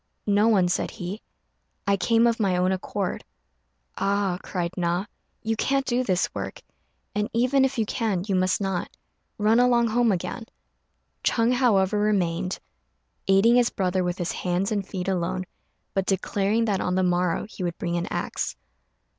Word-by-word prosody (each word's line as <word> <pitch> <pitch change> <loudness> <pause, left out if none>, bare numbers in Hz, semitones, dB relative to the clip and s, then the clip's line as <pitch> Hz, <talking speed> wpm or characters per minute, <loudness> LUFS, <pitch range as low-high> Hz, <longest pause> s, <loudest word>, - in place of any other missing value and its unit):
"No 205 +1 +3
one," 195 -6 +4
said 180 - 0
he; 200 +1 -6 0.6
"I 200 -1 +3
came 225 +5 +3
of 235 -1 +2
my 190 -4 +2
own 180 +1 +2
accord." 190 0 -3 0.7
"Ah," 195 -2 0
cried 175 -2 -3
Na, 175 +2 0 0.4
"you 225 0 0
can't 275 +4 +1
do 250 0 +1
this 185 -6 +1
work; - - -5 0.5
and 210 +2 -1
even 255 +4 +3
if 265 -1 0
you 225 - +1
can 210 -6 -1
you 205 - -1
must 185 0 +2
not. 195 -3 -2 0.5
Run 220 +2 +3
along 240 -1 +4
home 235 0 +3
again." 195 +5 -3 0.8
Ch'êng, 230 +1 +2
however, 210 -5 +3
remained, 185 -3 0 0.7
aiding 195 +5 +5
his 245 -1 +4
brother 185 -1 0
with 180 0 -2
his 175 -2 -2
hands 180 +3 -1
and 200 -3 -1
feet 185 -2 -4
alone, 185 0 -1 0.5
but 195 -1 -1
declaring 200 +3 +1
that 200 -4 0
on 180 - 0
the 185 - +2
morrow 180 -1 +1
he 215 - -10
would 175 -1 -2
bring 170 -3 -2
an 175 0 -1
axe. - - -3
195 Hz, 165 wpm, -25 LUFS, 180-225 Hz, 0.8 s, aiding